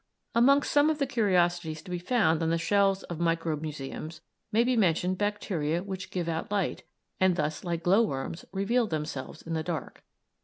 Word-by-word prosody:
Amongst 275 Hz, +5 st, +4 dB
some 290 Hz, +1 st, +5 dB
of 310 Hz, -, 0 dB
the 280 Hz, -, +1 dB
curiosities 175 Hz, -, +1 dB
to 180 Hz, -, -10 dB
be 180 Hz, -, -2 dB
found 175 Hz, -5 st, +2 dB
on 165 Hz, -, +1 dB
the 165 Hz, -, +2 dB
shelves 195 Hz, +3 st, +2 dB
of 170 Hz, -2 st, -6 dB
microbe 165 Hz, -2 st, 0 dB
museums 155 Hz, +1 st, -6 dB, 0.3 s
may 225 Hz, +2 st, +4 dB
be 250 Hz, +1 st, +1 dB
mentioned 185 Hz, -3 st, +2 dB
bacteria 180 Hz, -6 st, -1 dB
which 190 Hz, -1 st, -6 dB
give 175 Hz, -2 st, -3 dB
out 165 Hz, -1 st, -2 dB
light, 200 Hz, -3 st, -1 dB, 0.4 s
and 185 Hz, -1 st, +4 dB
thus, 150 Hz, -1 st, -2 dB
like 170 Hz, -2 st, -3 dB
glowworms, 175 Hz, -5 st, +1 dB
reveal 220 Hz, +5 st, +1 dB
themselves 155 Hz, -3 st, -5 dB
in 165 Hz, -, -5 dB
the 160 Hz, -, 0 dB
dark. 160 Hz, -2 st, -5 dB
175 Hz, 180 wpm, -28 LUFS, 160-205 Hz, 0.4 s, some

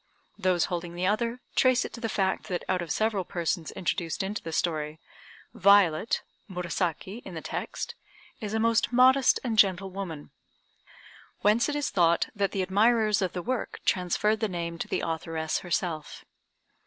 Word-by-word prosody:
Those 180 Hz, -2 st, +2 dB
holding 175 Hz, -1 st, -4 dB
the 180 Hz, +1 st, -1 dB
other, 230 Hz, +5 st, 0 dB
trace 255 Hz, -1 st, +4 dB
it -, -, -7 dB
to 235 Hz, -, -8 dB
the 225 Hz, -, -1 dB
fact 190 Hz, -2 st, 0 dB
that 180 Hz, -2 st, -3 dB
out 185 Hz, -1 st, 0 dB
of 170 Hz, -, -6 dB
several 215 Hz, -3 st, +1 dB
persons 170 Hz, -2 st, -2 dB
introduced 175 Hz, 0 st, -2 dB
into 200 Hz, +2 st, -3 dB
the 165 Hz, -, -6 dB
story, 155 Hz, -2 st, -1 dB, 0.5 s
Violet 200 Hz, 0 st, +4 dB, 0.3 s
(Murasaki 180 Hz, +3 st, -3 dB
in 185 Hz, -, -9 dB
the 160 Hz, -, -5 dB
text) -, -, -4 dB, 0.5 s
is 215 Hz, -1 st, -4 dB
a -, -, +1 dB
most 230 Hz, +1 st, +2 dB
modest 255 Hz, +2 st, +5 dB
and 225 Hz, -4 st, 0 dB
gentle 190 Hz, -1 st, +3 dB
woman, 180 Hz, -6 st, -6 dB, 1.1 s
whence 215 Hz, +6 st, +3 dB
it 295 Hz, -, -2 dB
is 290 Hz, -1 st, -1 dB
thought 170 Hz, -2 st, +3 dB
that 200 Hz, -1 st, +1 dB
the 195 Hz, -2 st, -1 dB
admirers 215 Hz, +2 st, +3 dB
of 185 Hz, -2 st, -1 dB
the 180 Hz, -, -4 dB
work 255 Hz, +2 st, -3 dB
transferred 200 Hz, +4 st, +1 dB
the 220 Hz, -, 0 dB
name 170 Hz, -2 st, -4 dB
to -, -, -3 dB
the -, -, -1 dB
authoress 160 Hz, -1 st, -2 dB
herself. 170 Hz, -3 st, -3 dB
190 Hz, 165 wpm, -28 LUFS, 170-220 Hz, 1.1 s, modest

